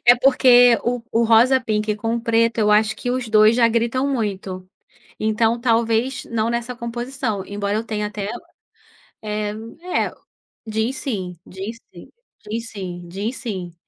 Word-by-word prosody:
É 245 Hz, -, +9 dB
porque 245 Hz, -2 st, +6 dB
o 245 Hz, 0 st, -1 dB
o 230 Hz, +1 st, +3 dB
rosa-pink 225 Hz, -2 st, +3 dB
com 225 Hz, +2 st, -2 dB
o -, -, -3 dB
preto, 230 Hz, 0 st, +1 dB
eu 210 Hz, -1 st, +3 dB
acho 215 Hz, +1 st, +3 dB
que 245 Hz, -, -3 dB
os 250 Hz, -2 st, -2 dB
2 215 Hz, +1 st, +6 dB
já 240 Hz, -2 st, +5 dB
gritam 235 Hz, +3 st, 0 dB
muito. 195 Hz, -7 st, -3 dB, 0.5 s
Então, 225 Hz, +2 st, +1 dB
talvez, 230 Hz, +1 st, +1 dB
não 225 Hz, -1 st, -1 dB
nessa 235 Hz, +1 st, -3 dB
composição, 235 Hz, -3 st, -4 dB
embora 200 Hz, 0 st, -2 dB
eu 220 Hz, -, -2 dB
tenha 210 Hz, -2 st, -2 dB
até, 210 Hz, -1 st, -5 dB, 0.9 s
eh, 210 Hz, -1 st, -2 dB, 0.3 s
é 360 Hz, -, 0 dB
o -, -, -18 dB, 0.5 s
jeans 220 Hz, +4 st, -1 dB
sim, 195 Hz, -11 st, -4 dB
jeans 200 Hz, +5 st, -7 dB, 0.2 s
sim, -, -, -13 dB, 0.4 s
jeans 230 Hz, +1 st, -4 dB
sim, 175 Hz, -4 st, -7 dB
jeans 205 Hz, +7 st, -4 dB
sim. 190 Hz, -8 st, -5 dB
225 Hz, 155 wpm, -21 LUFS, 210-240 Hz, 0.9 s, É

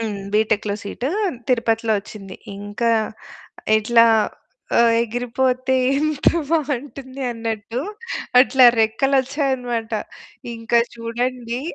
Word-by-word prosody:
హ్మ్. 210 Hz, -3 st, -3 dB
బీటెక్‌లో 210 Hz, -1 st, +1 dB
సీటు 240 Hz, +5 st, -4 dB, 0.4 s
తిరుపతిలో 230 Hz, -2 st, +1 dB
ఒచ్చింది. 195 Hz, -3 st, -10 dB, 0.2 s
ఇంక 205 Hz, +3 st, -7 dB, 1.0 s
ఇట్లా 230 Hz, +1 st, +4 dB, 0.7 s
ఆహ్, 235 Hz, -1 st, +5 dB
ఎగిరిపోతే 250 Hz, +2 st, -1 dB, 0.2 s
ఎంత 305 Hz, -1 st, +1 dB, 0.2 s
బావుంటుంది 275 Hz, -3 st, -3 dB
అన్నట్టు 225 Hz, +1 st, -4 dB, 0.6 s
అట్లా 260 Hz, 0 st, +5 dB, 0.2 s
రెక్కలొచ్చాయనమాట. 260 Hz, -1 st, 0 dB, 0.6 s
ఇంక 230 Hz, +1 st, -11 dB, 0.2 s
చూడండి 240 Hz, +1 st, -3 dB
235 Hz, 80 wpm, -21 LUFS, 225-260 Hz, 1.0 s, ఆహ్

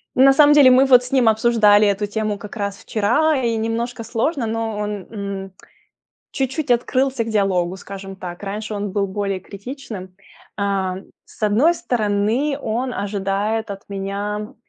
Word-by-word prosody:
ну, 260 Hz, -, +5 dB
на 275 Hz, -, +7 dB
самом 295 Hz, +1 st, +6 dB
деле, 285 Hz, -3 st, +7 dB
мы 260 Hz, +2 st, +6 dB
вот 250 Hz, -2 st, +6 dB
с 250 Hz, -, -9 dB
ним 255 Hz, -4 st, +4 dB
обсуждали 215 Hz, -2 st, +4 dB
эту 200 Hz, +1 st, 0 dB
тему 215 Hz, 0 st, -2 dB
как 210 Hz, +2 st, -10 dB
раз 200 Hz, -2 st, -3 dB
вчера, 295 Hz, +9 st, +1 dB
и 230 Hz, -1 st, +1 dB
немножко 230 Hz, +1 st, -3 dB
сложно, 240 Hz, +3 st, -1 dB
но 225 Hz, -1 st, -3 dB
он, 210 Hz, -2 st, -4 dB
м, 200 Hz, -3 st, -5 dB, 0.8 s
чуть-чуть 270 Hz, +1 st, -2 dB
открылся 255 Hz, 0 st, +1 dB
к -, -, -7 dB
диалогу, 190 Hz, -4 st, +1 dB
скажем 195 Hz, 0 st, -9 dB
так. 180 Hz, 0 st, -8 dB
Раньше 210 Hz, +2 st, -5 dB
он 205 Hz, -1 st, -3 dB
был 200 Hz, -1 st, 0 dB
более 195 Hz, -1 st, -3 dB
критичным. 200 Hz, -3 st, -9 dB, 0.4 s
А, 195 Hz, -2 st, -1 dB, 0.3 s
с -, -, -20 dB
одной 235 Hz, +12 st, +4 dB
стороны, 230 Hz, +4 st, 0 dB
он 245 Hz, +3 st, -2 dB
ожидает 205 Hz, +2 st, -2 dB
от 195 Hz, 0 st, -8 dB
меня, 200 Hz, +2 st, -4 dB
210 Hz, 160 wpm, -20 LUFS, 200-245 Hz, 0.8 s, на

